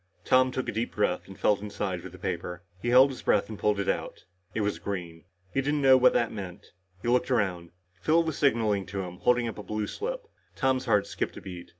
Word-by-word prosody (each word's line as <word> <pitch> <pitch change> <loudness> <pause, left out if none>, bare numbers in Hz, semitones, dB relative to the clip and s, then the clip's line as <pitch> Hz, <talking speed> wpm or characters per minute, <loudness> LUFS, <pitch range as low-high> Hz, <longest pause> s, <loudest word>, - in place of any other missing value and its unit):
Tom 130 0 +5
took 130 0 -3
a - - -1
deep 115 +2 -3
breath 105 -3 0
and 95 -1 -12
felt 105 -2 +2
inside 100 -3 -3
for 95 - -8
the 90 - -13
paper. 90 0 -4 0.2
He - - -4
held 130 +3 +7
his 130 - -8
breath 100 - +2
and 110 - -7
pulled 105 -1 +1
it 100 - -2
out. - - -3 0.3
It 110 - 0
was 105 0 -1
green. 85 -5 -5 0.3
He 135 - +2
didn't 145 +2 0
know 135 -1 +8
what 130 0 +5
it 115 - +2
meant. 100 -1 -8 0.3
He - - -3
looked 125 +2 +2
around. 95 -8 0 0.3
Phil 165 - +4
was 160 -3 -3
signaling 110 -9 +1
to 100 0 -3
him, 90 0 -8
holding 125 +2 +2
up 110 - -6
a - - -4
blue 105 +2 -2
slip. - - -4 0.3
Tom's 130 -1 +1
heart 105 -4 +3
skipped - - -4
a - - -8
beat. 90 -2 -9
105 Hz, 235 wpm, -28 LUFS, 95-130 Hz, 0.3 s, know